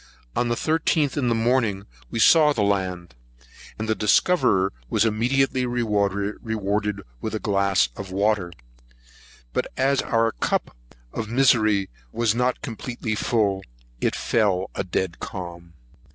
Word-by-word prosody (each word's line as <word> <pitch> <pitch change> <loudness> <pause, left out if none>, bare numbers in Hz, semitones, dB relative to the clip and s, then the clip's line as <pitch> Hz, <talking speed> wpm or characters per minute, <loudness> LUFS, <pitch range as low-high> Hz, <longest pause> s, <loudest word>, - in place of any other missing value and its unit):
On 120 - +1
the 120 - 0
13th, 155 0 +1
in 135 -5 0
the 115 - +2
morning, 115 -4 +1 0.2
we - - -4
saw 150 +5 +6
the 110 - 0
land, 95 -5 -1 0.6
and 110 - -4
the 110 - +2
discoverer 105 - +3 0.2
was 110 +1 +2
immediately 130 +4 +1
rewarded 105 -2 -1 0.2
with 110 - -3
a - - -2
glass 100 -5 +2
of 95 -2 -7
water; 100 -2 +1 1.0
but, - - 0
as 135 +1 +2
if - - -9
our 115 0 +2
cup - - -2 0.4
of 110 -1 -4
misery 110 -6 +3 0.2
was 115 -2 +1
not 125 +2 0
completely 120 -2 -4
full, 105 -3 +1 0.4
it - - 0
fell 95 -5 +1
a - - -2
dead 90 -1 -2
calm. 85 -2 -8
110 Hz, 135 wpm, -24 LUFS, 100-120 Hz, 1.0 s, saw